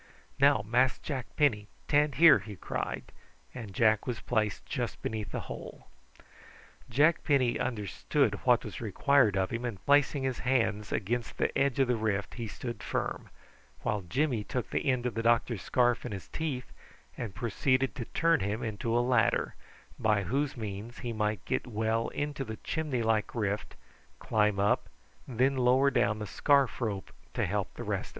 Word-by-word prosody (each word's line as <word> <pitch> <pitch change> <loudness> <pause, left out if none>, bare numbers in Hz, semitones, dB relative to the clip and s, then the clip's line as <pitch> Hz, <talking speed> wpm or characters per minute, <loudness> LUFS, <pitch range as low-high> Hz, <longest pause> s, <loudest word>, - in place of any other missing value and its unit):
"Now, 140 -6 +5
Mas' 125 +3 +3
Jack 130 -5 -5
Penny, 110 -9 +2 0.2
tan' 145 0 +3
here," 165 +3 +7
he 105 -2 -9
cried; - - -4 0.4
and 115 -5 -7
Jack 110 +2 +2
was 120 -3 -2
placed 110 -4 -1
just - - -3
beneath 105 -3 -3
the - - -3
hole. - - -9 1.0
Jack 150 +7 +3
Penny 130 -5 +2
understood 120 -6 0
what - - +3
was - - -7
required 140 -8 +3
of 95 -1 0
him, 115 +1 -3
and 115 -6 -4
placing 145 -1 +3
his 130 -2 -1
hands 115 -5 0
against 115 +3 -2
the - - 0
edge 140 -2 +2
of 135 -2 +3
the 125 - +2
rift 105 -2 -1
he 115 -2 -5
stood 120 +3 -6
firm, - - -3 0.5
while 105 - 0
Jimmy 120 - 0
took 125 +3 -4
the - - 0
end 125 -2 +1
of 125 - -1
the 115 - -2
doctor's 115 -2 +2
scarf 120 -1 +2
in - - -5
his 95 - -7
teeth 140 -6 -4 0.4
and 110 -6 -6
proceeded 130 +3 +1
to 125 -5 -5
turn 165 +4 +2
him 105 +4 -2
into 115 +1 -1
a - - +4
ladder, 120 -5 +2 0.5
by 105 -3 +2
whose 135 +8 -1
means 110 +2 -6
he 120 - -2
might 105 -3 -1
get - - -1
well 110 0 0
into 145 -1 -3
the 110 -4 -6
chimney 150 -7 -1
like 110 0 0
rift, 105 -2 -2 0.4
climb 105 -2 +1
up, 100 +1 +1 0.4
and 125 -4 -8
then 135 +2 +3
lower 130 +2 +4
down 105 -4 +2
the 105 - -4
scarf 140 +5 +2
rope 100 -5 -3 0.2
to - - +1
help - - -2
the - - -6
rest. - - -3
120 Hz, 175 wpm, -30 LUFS, 105-130 Hz, 1.0 s, here